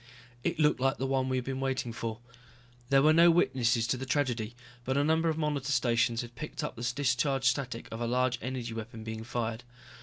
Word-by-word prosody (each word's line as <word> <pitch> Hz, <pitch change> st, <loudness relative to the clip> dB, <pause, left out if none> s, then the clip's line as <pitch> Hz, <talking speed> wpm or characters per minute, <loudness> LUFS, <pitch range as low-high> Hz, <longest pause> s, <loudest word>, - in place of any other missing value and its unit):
It 170 Hz, -1 st, -1 dB
looked 150 Hz, -3 st, +3 dB
like 135 Hz, +2 st, +1 dB
the 135 Hz, -, -2 dB
one 130 Hz, -1 st, 0 dB
we 130 Hz, -, +1 dB
had 125 Hz, -, -1 dB
been 130 Hz, 0 st, -3 dB
waiting 130 Hz, -3 st, -2 dB
for. 115 Hz, 0 st, -5 dB, 0.7 s
There 135 Hz, 0 st, +5 dB
were 155 Hz, +1 st, +6 dB
no 170 Hz, +2 st, +7 dB
witnesses 125 Hz, -8 st, +3 dB
to 125 Hz, +2 st, 0 dB
the 130 Hz, -, -5 dB
tragedy, 125 Hz, -5 st, -1 dB, 0.3 s
but 130 Hz, +2 st, -1 dB
a 140 Hz, -, +3 dB
number 160 Hz, +2 st, +2 dB
of 160 Hz, -, -1 dB
monitor 145 Hz, -3 st, -1 dB
stations 120 Hz, -2 st, +2 dB
had 120 Hz, 0 st, -10 dB
picked 155 Hz, +5 st, -6 dB
up 150 Hz, -, -4 dB
the 120 Hz, +1 st, -2 dB
discharge 135 Hz, 0 st, +1 dB
static 125 Hz, -2 st, 0 dB
of 115 Hz, +1 st, -5 dB
a 120 Hz, -, 0 dB
large 125 Hz, 0 st, +1 dB
energy 125 Hz, -1 st, -4 dB
weapon 115 Hz, 0 st, -7 dB
being 110 Hz, 0 st, -5 dB
fired. 115 Hz, 0 st, -3 dB
130 Hz, 215 wpm, -30 LUFS, 120-140 Hz, 0.7 s, no